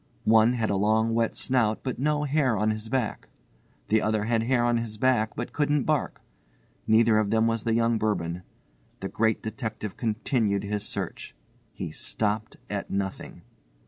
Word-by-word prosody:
One 110 +2 +5
had 115 -4 0
a - - +1
long 110 +3 +2
wet 115 0 +1
snout 115 -5 +1
but 130 -2 -3
no 150 +2 +1
hair 140 -5 +1
on 105 +2 +2
his 110 +1 -5
back. 125 -3 -2 0.6
The 110 0 +3
other 110 -1 0
had 115 0 +1
hair 120 +1 +2
on 120 -1 +2
his 115 -2 -4
back 110 -2 +2
but 120 - -5
couldn't 145 -2 +1
bark. 155 -2 -1 0.7
Neither 110 0 +5
of 105 -2 0
them 110 +1 +3
was 115 -1 0
the 115 -1 +2
young 115 -1 +2
Bourbon. 90 -5 -1 0.6
The - - -3
Great 110 0 0
Detective 110 -2 -5
continued 110 -2 0
his 105 0 -2
search. - - -5 0.4
He - - -6
stopped 110 0 -2
at 100 -2 -4
nothing. 95 -1 -4
110 Hz, 170 wpm, -26 LUFS, 110-120 Hz, 0.7 s, One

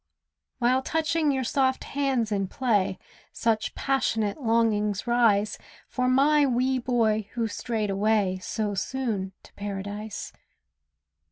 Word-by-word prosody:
While 255 +2 +2
touching 310 +1 +1
your 265 -1 0
soft 260 +1 +1
hands 265 -6 -1
in 195 -2 0
play 200 -6 0 0.3
Such 220 -2 -1
passionate 225 -3 0
longings 220 -4 +1
rise 225 -4 +2 0.3
For 250 -1 -1
my 290 +3 +4
wee 255 0 +1
boy 220 -4 +1
who 230 -2 -1
strayed 215 -1 -2
away 200 -2 +1
So 210 +2 -2
soon 205 -3 -2
to - - -18
Paradise. 205 +1 -6
225 Hz, 115 wpm, -26 LUFS, 205-260 Hz, 0.3 s, my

